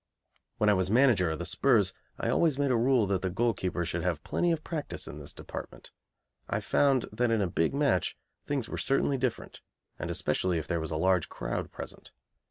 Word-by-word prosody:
When 105 - +2
I 105 - +6
was 95 -1 +1
Manager 115 -7 +4
of 80 - -2
the 85 - -5
'Spurs 100 -1 +3 0.2
I - - -1
always 160 -5 +2
made 140 -2 +1
a - - +3
rule 120 -1 +3
that 95 -1 -1
a 95 - +1
goalkeeper 95 -4 0
should - - -2
have - - -1
plenty 175 - +1
of 160 -2 -1
practice 155 -4 -4
in 75 - -7
this 75 - -7
department. - - -8 0.6
I - - 0
found 135 -3 +2
that 120 +3 +1
in 115 -1 +2
a 100 - +2
big 85 +5 0
match 140 -10 +1 0.3
things 140 -5 -2
were - - -5
certainly 135 0 +1
different, 125 -2 -3 0.4
and - - -4
especially 90 -2 0
if 80 - -3
there 85 -2 0
was 80 - -3
a 80 - -2
large 90 0 +2
crowd - - -4
present. - - -6
105 Hz, 205 wpm, -29 LUFS, 90-135 Hz, 0.6 s, I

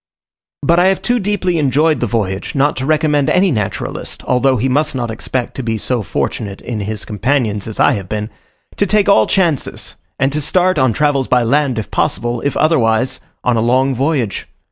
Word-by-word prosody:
But 170 +4 +3
I 180 - +4
have 190 0 +1
too 245 0 +1
deeply 185 -4 0
enjoyed 150 +3 +2
the 120 - 0
voyage, 100 -1 -2
not 145 +2 +2
to 130 +1 -3
recommend 150 -2 +2
any 185 0 +3
naturalist, 105 -7 -4
although 130 +1 +2
he 125 +4 0
must 145 +3 +1
not 120 -3 -2
expect 120 +2 -3
to - - -5
be 115 -2 -2
so 120 +2 -1
fortunate 100 +1 -3
in 115 -3 -5
his 105 +1 -4
companions 110 -2 -1
as 110 - -6
I - - +5
have 95 -3 -5
been, 105 +1 -3 0.5
to 200 - +1
take 210 +1 +2
all 110 -1 +5
chances, 170 -8 -1 0.2
and 135 +1 +1
to 150 - -1
start, 180 +2 +2
on 130 -2 +3
travels 140 0 +1
by 125 -1 +3
land 135 +1 +1
if 110 - -4
possible, 120 0 -1
if 140 -3 -1
otherwise, 130 -4 +2 0.2
on 125 -2 +1
a - - +1
long 130 +3 +2
voyage. 130 -4 -1
130 Hz, 195 wpm, -16 LUFS, 115-150 Hz, 0.5 s, I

